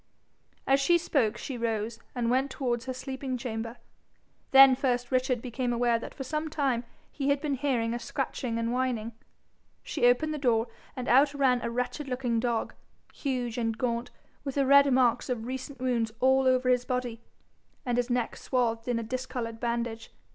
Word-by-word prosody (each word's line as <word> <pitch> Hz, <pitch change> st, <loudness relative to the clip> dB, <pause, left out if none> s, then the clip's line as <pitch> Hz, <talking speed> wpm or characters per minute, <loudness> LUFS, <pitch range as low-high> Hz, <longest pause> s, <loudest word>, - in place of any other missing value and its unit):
As 270 Hz, +1 st, +4 dB
she 345 Hz, +5 st, +4 dB
spoke 255 Hz, -9 st, 0 dB
she 255 Hz, -3 st, -6 dB
rose, 225 Hz, -1 st, -2 dB, 0.2 s
and 240 Hz, -1 st, 0 dB
went 265 Hz, +2 st, +2 dB
towards 245 Hz, -3 st, -2 dB
her 260 Hz, -, -3 dB
sleeping 265 Hz, 0 st, -4 dB
chamber. 230 Hz, -1 st, -5 dB, 0.7 s
Then 270 Hz, 0 st, +9 dB
first 245 Hz, -2 st, -1 dB
Richard 255 Hz, -2 st, +1 dB
became 250 Hz, 0 st, -2 dB
aware 235 Hz, -1 st, +2 dB
that -, -, -9 dB
for 270 Hz, -, -5 dB
some 305 Hz, +3 st, -3 dB
time 270 Hz, -6 st, 0 dB, 0.3 s
he 280 Hz, -1 st, -2 dB
had 280 Hz, 0 st, +3 dB
been 295 Hz, -1 st, -2 dB
hearing 250 Hz, -4 st, 0 dB
a 240 Hz, -, -3 dB
scratching 250 Hz, -2 st, -3 dB
and 230 Hz, +1 st, -1 dB
whining. 245 Hz, -3 st, -1 dB, 0.7 s
She 245 Hz, -, +1 dB
opened 310 Hz, +6 st, +2 dB
the 300 Hz, -, -4 dB
door, 230 Hz, -4 st, +2 dB, 0.3 s
and 255 Hz, -1 st, -5 dB
out 280 Hz, +3 st, +5 dB
ran 260 Hz, -3 st, +3 dB
a -, -, -2 dB
wretched 250 Hz, +4 st, -3 dB
looking 250 Hz, -3 st, -1 dB
dog, 235 Hz, -1 st, -1 dB, 0.4 s
huge 250 Hz, -4 st, -2 dB
and 225 Hz, -1 st, -1 dB
gaunt, 240 Hz, -2 st, -1 dB, 0.3 s
with 275 Hz, -2 st, -4 dB
the 280 Hz, -1 st, +2 dB
red 280 Hz, +1 st, +6 dB
marks 255 Hz, -2 st, +2 dB
of 235 Hz, -3 st, -2 dB
recent 260 Hz, +1 st, -6 dB
wounds 240 Hz, -3 st, 0 dB
all 265 Hz, +1 st, +4 dB
over 255 Hz, 0 st, +3 dB
his 250 Hz, -1 st, +3 dB
body, 250 Hz, -2 st, -3 dB, 0.6 s
and 245 Hz, -1 st, 0 dB
his 245 Hz, 0 st, 0 dB
neck 245 Hz, -1 st, 0 dB
swathed 230 Hz, -3 st, -1 dB
in 245 Hz, -1 st, +1 dB
a 230 Hz, -, -2 dB
discoloured 235 Hz, -1 st, -4 dB
bandage. 235 Hz, -1 st, -3 dB
250 Hz, 180 wpm, -28 LUFS, 235-265 Hz, 0.7 s, Then